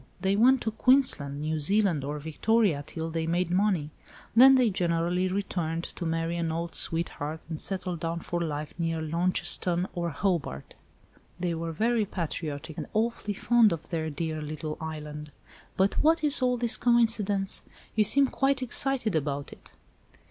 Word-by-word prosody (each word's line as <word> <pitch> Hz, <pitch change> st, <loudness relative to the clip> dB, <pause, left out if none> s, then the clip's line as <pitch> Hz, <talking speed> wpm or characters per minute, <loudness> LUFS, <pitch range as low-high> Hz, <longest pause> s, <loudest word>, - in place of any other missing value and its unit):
they 195 Hz, +1 st, +1 dB
went 255 Hz, +5 st, +4 dB
to 220 Hz, -, -2 dB
Queensland, 220 Hz, -, +5 dB
New 155 Hz, 0 st, -1 dB
Zealand, 185 Hz, -2 st, +1 dB
or 145 Hz, +2 st, -4 dB
Victoria 160 Hz, +2 st, +1 dB
till 160 Hz, 0 st, -5 dB
they 160 Hz, 0 st, -2 dB
made 175 Hz, +1 st, 0 dB
money. 180 Hz, -5 st, +1 dB, 0.4 s
Then 265 Hz, +3 st, +8 dB
they 250 Hz, -4 st, +3 dB
generally 175 Hz, 0 st, 0 dB
returned 175 Hz, -4 st, -2 dB
to 175 Hz, -, -6 dB
marry 165 Hz, +1 st, -2 dB
an 165 Hz, -1 st, -1 dB
old 165 Hz, +1 st, -4 dB
sweetheart 160 Hz, -2 st, -1 dB
and 160 Hz, -2 st, -5 dB
settle 185 Hz, -2 st, -3 dB
down 165 Hz, +1 st, -4 dB
for 175 Hz, +1 st, -3 dB
life 150 Hz, -2 st, -4 dB
near 165 Hz, -1 st, -1 dB
Launceston 175 Hz, +2 st, 0 dB
or 170 Hz, -1 st, -2 dB
Hobart. 160 Hz, -, -2 dB, 0.7 s
They 175 Hz, -1 st, -1 dB
were 165 Hz, 0 st, -4 dB
very 225 Hz, +6 st, +1 dB
patriotic, 160 Hz, -3 st, -5 dB
and -, -, -5 dB
awfully 220 Hz, -2 st, -1 dB
fond 235 Hz, 0 st, +4 dB
of 160 Hz, -2 st, -5 dB
their 160 Hz, -2 st, -2 dB
dear 155 Hz, +1 st, -4 dB
little 155 Hz, +1 st, -5 dB
island. 150 Hz, -1 st, -7 dB, 0.5 s
But 190 Hz, +1 st, +2 dB
what 320 Hz, +1 st, +3 dB
is 290 Hz, -2 st, +3 dB
all 250 Hz, -1 st, +2 dB
this 235 Hz, -1 st, +1 dB
coincidence? 220 Hz, -5 st, +2 dB, 0.3 s
You 215 Hz, -, +4 dB
seem 275 Hz, +7 st, +4 dB
quite 270 Hz, 0 st, 0 dB
excited 250 Hz, -4 st, +1 dB
about 145 Hz, -2 st, -2 dB
it." -, -, -18 dB
170 Hz, 160 wpm, -27 LUFS, 160-215 Hz, 0.7 s, Then